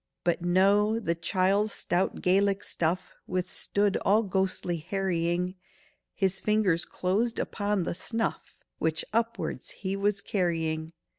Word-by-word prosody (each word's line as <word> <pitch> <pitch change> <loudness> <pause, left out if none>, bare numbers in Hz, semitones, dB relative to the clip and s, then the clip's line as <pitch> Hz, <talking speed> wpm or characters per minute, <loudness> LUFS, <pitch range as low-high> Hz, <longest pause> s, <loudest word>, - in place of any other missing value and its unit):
But 175 0 +1
no—the 200 +2 +3
chiel's 190 +5 +1
stout 180 +2 -1
Gaelic 195 +2 +3
stuff 175 +3 -1
Withstood 190 +2 0
all 210 +3 +3
ghostly 190 -3 0
harrying; 180 0 -1 0.6
His 195 -1 +1
fingers 210 -6 +2
closed 215 +6 0
upon 205 -3 -1
the - - -2
snuff 225 +6 -3 0.2
Which 160 0 0
upwards 230 0 -1
he 190 0 -4
was 200 0 +1
carrying. 165 -5 -1
190 Hz, 115 wpm, -28 LUFS, 175-205 Hz, 0.6 s, no—the